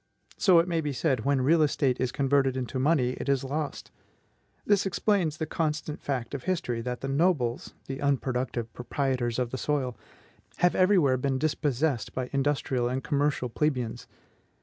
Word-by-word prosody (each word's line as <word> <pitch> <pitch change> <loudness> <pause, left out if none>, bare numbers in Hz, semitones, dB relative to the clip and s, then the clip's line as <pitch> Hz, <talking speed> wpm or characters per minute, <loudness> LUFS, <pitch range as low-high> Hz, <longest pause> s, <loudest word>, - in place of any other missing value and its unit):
So 185 -4 +5
it 165 +1 +4
may 165 -2 0
be 145 -2 -2
said, 130 -3 0
"When 140 -1 +2
real 155 +5 +4
estate 140 -4 +1
is 130 -1 0
converted 135 -1 +2
into 130 0 -3
money, 130 -3 +2
it - - -3
is 135 -1 +2
lost." 145 +2 -4 0.7
This 200 -1 +3
explains 185 -5 +1
the 160 - -2
constant 155 -1 -2
fact 130 -4 -3
of 135 -3 -5
history, 165 -11 -1
that 125 +1 -4
the 135 - -3
nobles 135 -4 0
the 135 +1 -6
unproductive 130 -4 -1
proprietors 125 -2 -1
of 125 -2 -1
the 130 - -4
soil 135 -5 -1 0.6
have 180 0 +3
every 190 +2 +4
where 135 -6 +3
been 135 +1 0
dispossessed 145 -2 -1
by 130 -1 -3
industrial 135 -3 0
and 130 +1 -2
commercial 145 -3 0
plebeians. 125 -3 -2
140 Hz, 170 wpm, -28 LUFS, 125-155 Hz, 0.7 s, So